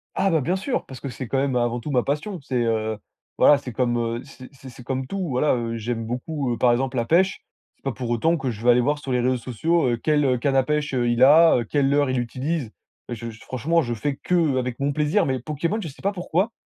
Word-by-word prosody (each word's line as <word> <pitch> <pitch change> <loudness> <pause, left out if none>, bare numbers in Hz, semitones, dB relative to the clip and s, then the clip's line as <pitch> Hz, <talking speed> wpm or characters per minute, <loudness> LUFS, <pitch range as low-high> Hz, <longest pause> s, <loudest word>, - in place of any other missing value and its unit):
Ah 195 - +2
bah, 160 - +2
bien 175 +8 0
sûr, 245 +7 -2
parce 130 -2 -10
que 140 - -6
c'est, 125 0 -6
quand 135 - -1
même, 135 -1 0
avant 120 0 0
tout 145 - -6
ma 125 -3 +2
passion. 155 +7 -3
C'est, 130 -2 -5
heu, 110 -1 -1 0.4
voilà, 150 - +6
c'est 130 -3 -7
comme, 120 0 0
heu, 115 0 -2
c'est 130 -2 -13
c'est 135 0 -12
c'est 125 0 -13
comme 130 +1 -3
tout, 195 - -4
heu, 180 -4 -2
voilà, 130 +2 +2
heu. 115 -1 -3
J'aime 115 0 -3
beaucoup, 130 +3 -3
heu, - - -4
par 120 0 +4
exemple, 130 +1 -1
la 115 - +1
pêche. 185 +7 +2 0.3
C'est - - -41
pas 135 - -1
pour 125 -1 -5
autant 160 +9 +2
que 135 -4 -2
je 110 -1 -6
vais 120 - +6
aller 125 +1 +4
voir 145 +4 +1
sur 135 - -6
les 125 - +2
réseaux 125 +1 +1
sociaux, 130 +6 0
heu, 120 - 0
quelle, 150 +4 +1
heu, 125 -2 +2
canne 135 +2 0
à 135 - +4
pêche 150 0 -1
heu, 120 -2 +1
il 120 +1 +3
a, 150 -2 +6
quel 140 -2 +2
leurre 145 -1 +2
il 130 - 0
utilise. 130 +2 -3 0.4
Heu, - - -1
je 115 +1 -6
j 115 0 -12
franchement 160 +7 0
je 120 -1 -3
fais 135 +5 -2
qu'avec 130 -9 0
mon 140 +1 0
plaisir, 150 +7 +1
mais 130 -2 -1
Pokémon 160 - -2
je 165 - -5
sais 140 - -12
pas 200 - +1
pourquoi. 185 +3 -1
130 Hz, 270 wpm, -23 LUFS, 120-150 Hz, 0.4 s, voilà